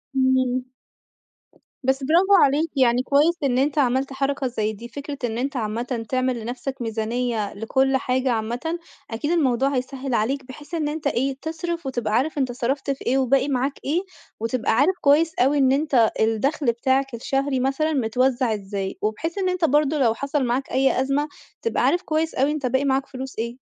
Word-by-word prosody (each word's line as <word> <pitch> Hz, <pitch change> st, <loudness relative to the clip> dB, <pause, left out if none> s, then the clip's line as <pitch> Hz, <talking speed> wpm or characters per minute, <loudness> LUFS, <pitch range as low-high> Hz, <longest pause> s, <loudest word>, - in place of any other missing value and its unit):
إمم. 260 Hz, -1 st, +2 dB, 1.2 s
بس 265 Hz, +1 st, +1 dB
برافو 360 Hz, +7 st, +5 dB
عليك، 290 Hz, +4 st, +2 dB
يعني 250 Hz, -1 st, +3 dB
كويس 290 Hz, +6 st, +3 dB
إن 255 Hz, -3 st, +2 dB
أنت 280 Hz, +3 st, +1 dB
عملت 270 Hz, 0 st, +1 dB
حركة 275 Hz, 0 st, -1 dB
زي 220 Hz, -3 st, -2 dB
دي، 230 Hz, +3 st, -9 dB
فكرة 285 Hz, +3 st, -7 dB
إن 230 Hz, -2 st, -1 dB
أنت 270 Hz, +3 st, -2 dB
عامةً 230 Hz, +1 st, -3 dB
تعمل 255 Hz, -1 st, 0 dB
لنفسك 250 Hz, +3 st, -5 dB
ميزانية 225 Hz, -1 st, -2 dB
لكل 265 Hz, +6 st, +1 dB
حاجة 255 Hz, 0 st, 0 dB
عامةً 240 Hz, +9 st, -2 dB, 0.3 s
أكيد 265 Hz, +8 st, -2 dB
الموضوع 270 Hz, -6 st, +2 dB
هيسهّل 260 Hz, +1 st, -3 dB
عليك، 255 Hz, +5 st, 0 dB
بحيث 290 Hz, +5 st, -12 dB
إن 315 Hz, -3 st, 0 dB
أنت 300 Hz, 0 st, -2 dB
إيه، 270 Hz, +1 st, 0 dB
تصرف 330 Hz, +1 st, -4 dB
وتبقى 240 Hz, -5 st, -2 dB
عارف 270 Hz, +7 st, +1 dB
أنت 265 Hz, -3 st, 0 dB
صرفت 265 Hz, +3 st, -1 dB
في 275 Hz, -, -6 dB
إيه 260 Hz, -, +2 dB
وباقي 270 Hz, +1 st, +2 dB
معاك 270 Hz, 0 st, 0 dB
إيه، 315 Hz, +6 st, +1 dB, 0.4 s
وتبقى 230 Hz, +1 st, -1 dB
عارف 295 Hz, +11 st, +3 dB
كويس 315 Hz, +3 st, +4 dB
أوي 275 Hz, +4 st, +3 dB
إن 265 Hz, -2 st, +4 dB
أنت 270 Hz, -5 st, +3 dB
الدخل 225 Hz, +7 st, +1 dB
بتاعك 265 Hz, +3 st, 0 dB
الشهري 270 Hz, +3 st, -1 dB
مثلًا 275 Hz, +5 st, 0 dB
متوزّع 255 Hz, -1 st, +1 dB
إزاي، 195 Hz, -1 st, -4 dB
وبحيث 285 Hz, -, -2 dB
إن 380 Hz, -2 st, +1 dB
أنت 365 Hz, -2 st, +1 dB
برضه 300 Hz, 0 st, +2 dB
لو 235 Hz, -5 st, +3 dB
حصل 280 Hz, +3 st, -1 dB
معاك 250 Hz, +3 st, -1 dB
أي 265 Hz, 0 st, +2 dB
أزمة 275 Hz, +3 st, 0 dB, 0.3 s
تبقى 460 Hz, -, 0 dB
عارف 350 Hz, -, +3 dB
كويس 320 Hz, -2 st, -1 dB
أوي 275 Hz, +3 st, +2 dB
أنت 300 Hz, -3 st, -3 dB
باقي 260 Hz, +3 st, +1 dB
معاك 270 Hz, 0 st, +1 dB
فلوس 265 Hz, 0 st, -7 dB
إيه. 235 Hz, +2 st, -3 dB
265 Hz, 175 wpm, -23 LUFS, 245-285 Hz, 1.2 s, برافو